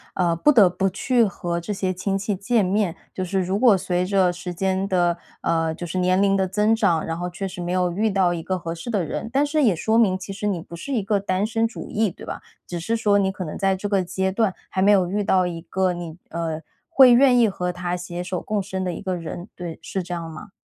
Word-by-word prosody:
呃， 175 -2 +2
不 295 - +4
得 215 -9 +6
不 190 +2 0
去 235 +5 +2
和 175 -3 -3
这 190 +5 -4
些 190 -1 -1
亲 195 +2 -1
戚 200 +1 -2
见 210 +3 +1
面， 190 -2 0 0.2
就 185 - -3
是 190 +1 0
如 185 +2 -1
果 235 -5 +6
随 180 -1 -1
着 190 -2 +3
时 175 0 -6
间 190 +2 0
的 175 -3 +1 0.2
呃， 165 -1 0
就 175 - -6
是 170 - -4
年 185 +1 +2
龄 195 -1 +3
的 190 -1 +1
增 210 +4 +2
长， 180 -8 +1
然 165 0 -3
后 175 +1 -3
确 185 +3 -4
实 185 -1 -7
没 175 0 -3
有 180 -1 +1
遇 210 +5 +1
到 190 -3 +2
一 170 - -4
个 185 +2 -1
合 165 -1 -5
适 170 +8 -8
的 205 -6 0
人， 165 +7 -4
但 280 +2 +3
是 300 +1 +1
也 215 -8 +4
说 220 +7 +1
明， 200 -5 +4
其 190 +1 -8
实 210 +1 -3
你 185 -5 -1
不 170 - -10
是 275 +12 -5
一 225 -5 0
个 205 0 +1
单 195 0 0
身 225 +1 +1
主 225 - -9
义， 215 0 +1
对 - - -12
吧？ - - -6 0.3
只 175 - -4
是 200 +7 -1
说 210 -3 +3
你 195 -1 +2
可 190 -1 -6
能 155 - -6
在 195 -1 +2
这 205 +2 -4
个 195 -2 +2
阶 190 +2 -1
段， 200 -1 +1 0.2
还 190 - -1
没 200 +2 +5
有 190 -3 +4
遇 205 +2 0
到 185 -2 +3
一 170 -1 -5
个 185 +1 0
你 170 -2 -7
呃， 165 -2 -3 0.3
会 265 -6 +7
愿 250 0 +6
意 235 -3 +5
和 180 -2 -2
他 180 0 -3
携 175 0 -5
手 180 0 -3
共 210 -1 -1
生 190 -1 -4
的 180 -1 -2
一 - - -7
个 185 -2 -2
人， 175 +3 -7
对。 175 -2 -7
是 190 +3 -3
这 175 - -6
样 165 -1 -4
吗？ 160 +6 -10
190 Hz, 290 characters per minute, -23 LUFS, 175-205 Hz, 0.3 s, 会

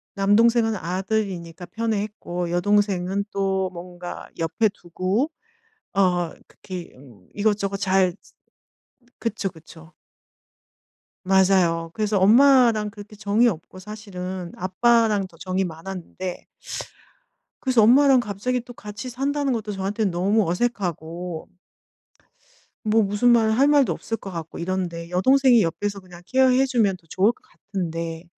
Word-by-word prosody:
남동생은 225 +3 +3
아들이니까 185 -2 -3
편애했고 210 -6 -3
여동생은 195 +1 +1
또 190 -1 0
뭔가 175 0 -8
옆에 170 +7 +1
두고 195 - -2 0.6
어 180 -3 +2 0.2
그렇게 180 -3 -9 0.4
이것저것 205 -1 0
잘 190 -2 +2 1.1
그쵸, 215 -4 -2
그쵸. 160 0 -15 1.3
맞아요. 185 -3 +3
그래서 210 -2 0
엄마랑 230 0 +5
그렇게 205 0 -12
정이 210 +4 +2
없고 185 -1 -4
사실은 185 -3 -7
아빠랑 210 +2 +2
더 170 -2 -20
정이 185 +3 -1
많았는데. 180 +1 -6 1.2
그래서 255 -4 +3
엄마랑 265 +4 +6
갑자기 240 +3 -2
또 245 +1 -11
같이 215 +4 -8
산다는 275 +2 -1
것도 220 -2 -3
저한테 200 +2 -2
너무 195 +1 +1
어색하고 175 -5 -3 1.4
뭐 220 +1 +4
무슨 205 +4 +2
말 225 -2 +4
할 265 +6 +4
말도 290 -3 +4
없을 225 - -4
것 195 - -9
같고 165 -2 -7
이런데 170 -2 -3
여동생이 255 +5 +4
옆에서 200 +5 -2
그냥 180 -2 -14
케어해 260 +2 +4
주면 225 -8 +1
더 165 - -29
좋을 200 +4 +3
것 - - -24
같은데, 165 -4 -5
200 Hz, 270 characters per minute, -23 LUFS, 180-225 Hz, 1.4 s, 엄마랑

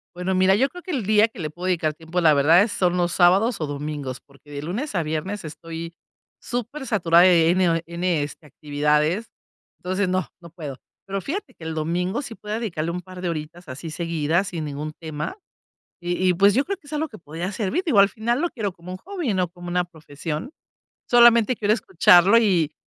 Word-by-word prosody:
Bueno 180 +1 -1
mira 185 +1 +4
yo 265 +6 +2
creo 355 +3 -11
que 370 - -6
el 260 - -2
día 215 +1 +5
que 225 - -15
le 155 -3 -3
puedo 175 +4 -8
dedicar 165 -5 0
tiempo 165 +3 -3
la 155 -3 +5
verdad 155 +6 +6
es 210 +1 +1
son 180 -3 +1
los 175 -1 +1
sábados 195 +7 +4
o 155 - -1
domingos 145 -2 -5
porque 140 +1 -20
de 140 0 -5
lunes 210 - -4
a 175 - +1
viernes 160 +6 -3
estoy 165 +1 -8 0.4
súper 245 +4 -5
saturada 175 -7 +4
de 170 -3 +5
n 185 +1 +3
o 165 - +2
eh, 165 - -3
de 170 - -12
n 175 -3 0
este 145 +2 -7
actividades, 150 - 0 0.5
entonces 185 +2 -1
no, 185 0 0
no 170 -2 -13
puedo. 150 -6 -7 0.3
Pero 195 0 -2
fíjate 280 - -5
que - - -14
el 160 0 -4
domingo 175 - -1
sí 240 -5 -8
podría 210 +1 -5
dedicarle 170 -8 -3
un 180 +1 -4
par 185 0 -11
de 180 - -1
horitas 165 +2 -6
así 140 +6 -7
seguidas 165 +2 -1
sin 165 -3 -4
ningún 150 +1 -5
tema 155 0 -5 0.7
y 175 +1 0
y 180 - +3
pues 200 +3 +5
yo 270 +7 +1
creo 395 +2 -2
que 330 - -23
es 290 - -13
algo 310 +1 -1
que 220 - -12
podría 165 +4 -5
servir. 220 - -1
Digo, 280 -11 +2
al 200 0 +6
final 235 +6 -1
lo 345 - 0
quiero 210 -5 -3
como 175 0 -10
un 185 - -6
hobby, 350 - -3
no 185 -2 0
como 175 +1 -11
una 180 0 +1
profesión. 160 - -6 0.6
Solamente 240 -1 +6
quiero 210 -1 +2
escucharlo 190 -1 +5
y 180 -9 +2
180 Hz, 220 wpm, -23 LUFS, 160-210 Hz, 0.7 s, verdad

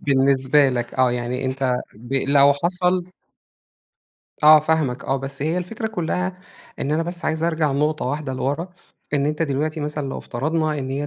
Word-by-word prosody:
بالنسبة 135 +1 +3
لك، 120 -2 -3
آه، 130 -1 +3
يعني 125 +2 -3
أنت 130 -1 0 0.2
ب 120 +5 -10
لو 140 +1 +5
حصل 180 +4 0 1.3
آه 155 +1 +9
فاهمك 155 -5 0
آه. 135 - 0
بس 135 +1 -4
هي 160 +4 0
الفكرة 215 +6 -4
كُلّها 180 -2 -2 0.4
إن 140 - -2
أنا 160 +2 +1
بس 175 +1 -4
عايزأرجع 160 -2 0
نُقطة 150 +2 0
واحدة 145 +1 -3
لوَرا. 145 +7 -2 0.5
إن 140 -1 +1
أنت 150 +2 -1
دلوقتي 155 +1 -1
مثلًا 150 -1 -3
لو - - -4
افترضنا 155 +4 -1
إن 130 -1 -4
هي 145 +2 -2
145 Hz, 165 wpm, -22 LUFS, 135-160 Hz, 1.3 s, آه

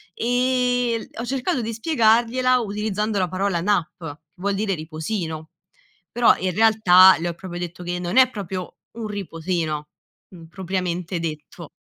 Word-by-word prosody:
ehm, 245 -1 0 0.2
ho - - -4
cercato 265 +3 -1
di 230 0 -4
spiegargliela 240 0 +2
utilizzando 210 -1 -2
la 180 -1 0
parola 185 -1 -1
nap, 180 -4 +1
che 155 -4 -7 0.2
vuol 200 +1 0
dire 200 -1 -1
riposino. 160 0 -5 0.6
Però 240 -1 +4
in 185 -1 -2
realtà, 190 -3 +6
le 175 +1 -2
ho - - -4
proprio 175 +1 -8
detto 175 0 -6
che 175 0 -3
non 180 +5 -3
è 260 -1 +7
proprio 190 -5 -6 0.2
un 230 -1 -6
riposino, 165 -6 -3 0.4
uhm, 170 -3 -13
propriamente 180 -1 -3
detto. 160 0 -7
190 Hz, 145 wpm, -22 LUFS, 175-225 Hz, 0.6 s, è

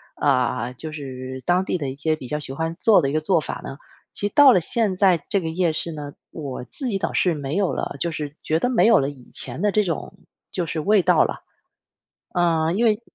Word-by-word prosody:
呃， 125 -3 +1
就 155 +3 -6
是 130 -3 -7
当 180 +1 +3
地 185 - -1
的 145 -5 -3
一 130 - -6
些 155 +2 0
比 135 -5 -9
较 150 +4 -2
喜 145 - -6
欢 160 +3 -3
做 215 -5 +5
的 135 - 0
一 - - -4
个 155 - +1
做 170 +2 +2
法 155 - -5
呢。 135 - -7 0.4
其 205 - -2
到 285 +5 +7
了 210 - +5
现 205 +2 -1
在 185 -4 +3
这 200 - +2
个 170 - -4
夜 170 +1 +1
市 160 +2 -3
呢， 145 -2 -7 0.2
我 140 -5 -6
自 260 - -3
己 210 -5 0
倒 - - -2
是 180 - +2
没 145 -1 -4
有 195 -2 +1
了， - - -3
就 170 - -1
是 150 -2 -5
觉 160 +1 +1
得 245 - +1
没 250 - +3
有 230 -2 +6
了 135 - 0
以 135 -4 -13
前 130 +5 -6
的 205 0 +2
这 210 +1 +3
种 170 +1 -3 0.4
就 180 - -2
是 160 -1 -3
味 205 +4 +4
道 - - +4
了。 - - -3 0.9
呃， 165 -2 +2
因 225 +5 +1
为 215 0 +2
160 Hz, 260 characters per minute, -23 LUFS, 145-190 Hz, 0.9 s, 到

